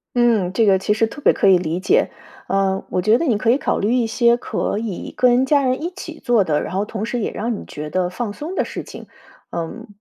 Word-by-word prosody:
嗯， 230 -7 +2
这 225 - +3
个 195 -2 +4
其 210 +2 0
实 225 +1 +2
特 250 +6 -9
别 - - +5
可 195 - +2
以 185 - +6
理 170 0 -3
解。 425 - +2 0.4
呃， 195 0 +1
我 180 - -1
觉 215 +5 +4
得 335 - -1
你 235 -7 +2
可 225 +2 +1
以 255 - +3
考 - - -1
虑 210 +4 0
一 245 -2 +2
些 235 +1 +3
可 210 - -2
以 215 -5 -5
跟 250 0 +4
家 285 +1 +3
人 255 +3 0
一 340 - -2
起 330 -4 -8
做 240 -5 +2
的， 150 -4 0
然 185 - -6
后 200 +2 0
同 215 -1 -4
时 235 +1 -2
也 - - -1
让 230 +3 -3
你 - - -10
觉 150 +1 -7
得 180 +2 0
放 205 +4 -4
松 310 - -6
的 - - +1
事 - - -6
情。 - - -11 0.4
嗯， 170 +8 -5
225 Hz, 275 characters per minute, -20 LUFS, 190-245 Hz, 0.4 s, 以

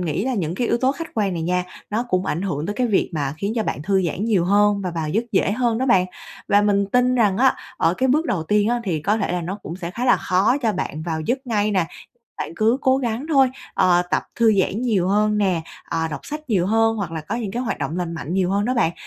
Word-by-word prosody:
nghĩ 180 +4 -1
là 260 - -1
những 170 -6 -2
cái 240 +5 -1
yếu - - +2
tố 260 +2 +2
khách 330 +2 -7
quan 205 -4 0
này 165 -2 -3
nha, 180 +2 0 0.3
nó 220 +3 0
cũng 185 -1 0
ảnh 170 +5 -1
hưởng 155 -5 -2
tới 205 - -3
cái 250 -1 +1
việc 205 -4 +1
mà 140 -2 -2
khiến 200 +4 -2
cho 220 - +2
bạn 145 - -3
thư 190 +3 +1
giãn 190 +6 -2
nhiều 205 -7 +2
hơn 205 +2 +3
và 185 - -2
vào 165 -2 -3
giấc 220 +9 0
dễ 195 0 +2
hơn 235 0 0
đó 260 - 0
bạn. 185 -6 +4 0.4
Và 205 0 +4
mình 200 -1 +2
tin 250 +4 +2
rằng 210 -6 +3
á, 265 +1 +4 0.2
ở 165 - +2
cái 260 +6 0
bước 305 +6 +2
đầu 170 -5 -1
tiên 210 +5 +2
á 240 0 +1
thì 170 -6 -1
có 205 +6 +2
thể 220 - -1
là 180 - -1
nó 190 +5 -4
cũng 170 - -6
sẽ 175 -2 -5
khá 235 +7 -4
là 245 - +5
khó 200 +8 +2
cho 225 - +2
bạn 155 -5 -4
vào 160 -1 -3
giấc 255 - -2
ngay 215 -3 +1
nè, 185 -5 +1 0.5
bạn - - -4
cứ 225 +3 +2
cố 260 -1 +3
gắng 240 0 -2
thôi. 270 -4 +5 0.2
Ờ, 175 -1 +4
tập - - +1
thư 225 -2 +4
giãn 200 +4 0
nhiều 205 -8 +1
hơn 210 +2 +2
nè, 185 -5 +1 0.3
ờ, 165 0 0
đọc 155 - -5
sách 305 -2 -7
nhiều 185 -5 +2
hơn 225 +2 +2
hoặc 195 -6 -4
là 160 - -4
có 200 +9 -4
những 225 -5 -3
cái 245 +5 -2
hoạt 240 - -2
động 155 +6 -3
lành 175 -2 -3
mạnh 165 0 -5
nhiều 185 -1 +1
hơn 200 +1 +1
đó 255 - +1
bạn. 225 -9 +2
205 Hz, 280 wpm, -22 LUFS, 180-235 Hz, 0.5 s, là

